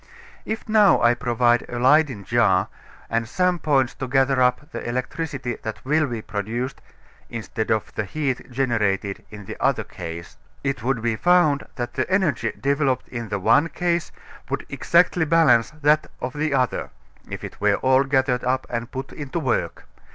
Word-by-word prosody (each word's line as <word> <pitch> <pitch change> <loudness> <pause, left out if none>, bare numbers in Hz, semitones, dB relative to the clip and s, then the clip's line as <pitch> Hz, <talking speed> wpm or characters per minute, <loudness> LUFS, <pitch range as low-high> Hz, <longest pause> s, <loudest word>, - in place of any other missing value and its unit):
If 220 +1 -4
now 215 -2 +5
I 120 0 +4
provide 120 0 +2
a 120 - -4
Leyden 130 -3 +3
jar 95 -3 +2 0.4
and 115 0 -1
some 180 +3 +1
points 135 -5 +2
to 130 - -5
gather 135 0 +2
up 125 +5 +1
the - - -6
electricity 125 +1 -3
that 110 +2 -6
will 155 +2 +2
be 115 -4 -5
produced 115 +6 -4 0.5
(instead 110 0 -4
of 110 -1 0
the 105 - -2
heat 140 +2 -3
generated 105 -6 0
in 105 -2 -10
the - - -7
other - - +1
case), 85 -1 -8 0.3
it 135 -3 -1
would 125 -1 -1
be 115 -1 +1
found 155 0 +3
that 120 -2 -4
the - - -2
energy 190 -5 +1
developed 140 -2 0
in 115 -3 -5
the 100 - -1
one 115 - +3
case 170 -1 -1 0.4
would - - -3
exactly 175 0 +2
balance 150 -8 +4
that 155 0 +1
of 125 0 -4
the 150 +1 -1
other, 130 -3 0 0.4
if - - -6
it - - -9
were 105 -1 +4
all 130 +3 +3
gathered 130 -2 +1
up 130 +1 0
and 120 0 -3
put 130 +1 -6
into 145 0 -5
work. 130 -7 -2
130 Hz, 170 wpm, -23 LUFS, 115-150 Hz, 0.5 s, now